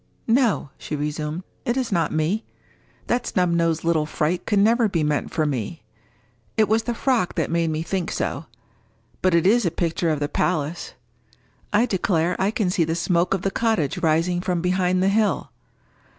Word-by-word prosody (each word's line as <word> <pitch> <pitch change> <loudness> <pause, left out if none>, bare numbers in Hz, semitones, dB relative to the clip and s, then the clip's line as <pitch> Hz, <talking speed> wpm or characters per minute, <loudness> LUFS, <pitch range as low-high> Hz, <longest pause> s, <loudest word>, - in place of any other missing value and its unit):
—No," 230 - +2
she 155 - -4
resumed, 150 +3 -3 0.2
"it 240 -1 -1
is 250 -3 -1
not 170 -4 +1
me. 165 +8 0 0.6
That 240 0 -1
snub 180 -2 +1
nosed 165 -1 +1
little 160 -2 +1
fright 160 +3 -1
could 210 - +2
never 225 +2 +4
be 165 -5 0
meant 150 -1 0
for 155 - 0
me! 145 +3 -3 0.7
It 215 - +4
was 220 +2 +2
the 240 +1 -3
frock 235 -8 0
that - - -1
made 170 -1 +1
me 155 0 -2
think 180 +1 -2
so. 165 - -3 0.7
But 185 -2 +3
it 170 - +3
is 230 +5 +4
a 175 - +2
picture 165 0 -1
of 155 -2 0
the 145 - -1
place. 160 0 -2 0.8
I 215 +3 +4
declare, 180 -5 0
I 190 - +2
can 210 -4 0
see 175 - +2
the 165 +1 -1
smoke 170 +2 +1
of 190 - -5
the 195 - 0
cottage 220 - 0
rising 165 +3 +1
from 180 -1 -1
behind 180 +1 +1
the 195 - +3
hill! 210 +1 +1
175 Hz, 185 wpm, -23 LUFS, 160-205 Hz, 0.8 s, never